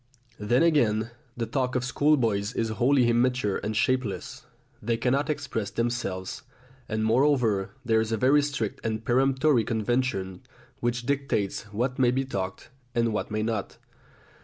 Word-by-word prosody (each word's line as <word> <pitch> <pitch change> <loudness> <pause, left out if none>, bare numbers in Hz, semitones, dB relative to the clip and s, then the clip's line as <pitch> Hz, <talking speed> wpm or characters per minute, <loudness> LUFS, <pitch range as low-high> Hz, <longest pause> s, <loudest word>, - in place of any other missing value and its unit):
Then 120 +7 +2
again 115 -9 +2 0.3
the 115 - -1
talk 125 +2 -1
of 125 - +1
schoolboys 125 -7 +1
is 115 - 0
wholly 125 +3 +3
immature 120 -3 +2
and 110 0 -3
shapeless. 125 -3 -1 0.3
They 115 +2 0
cannot 135 +5 0
express 140 -8 -2
themselves, 115 -6 -3 0.5
and 110 0 -1
moreover 115 -5 +2
there 110 -1 +3
is 110 0 -3
a 115 - +1
very 135 +6 +4
strict 140 -8 -3
and 110 0 -3
peremptory 130 +1 +3
convention 110 -4 -1 0.4
which 120 0 -1
dictates 135 -7 -1
what 125 +5 -2
may 125 -2 +5
be 130 +2 0
talked 95 -6 -5 0.2
about - - +1
and 115 -1 +1
what 105 - -2
may 110 0 -1
not. 110 -3 -3
120 Hz, 150 wpm, -27 LUFS, 110-130 Hz, 0.5 s, may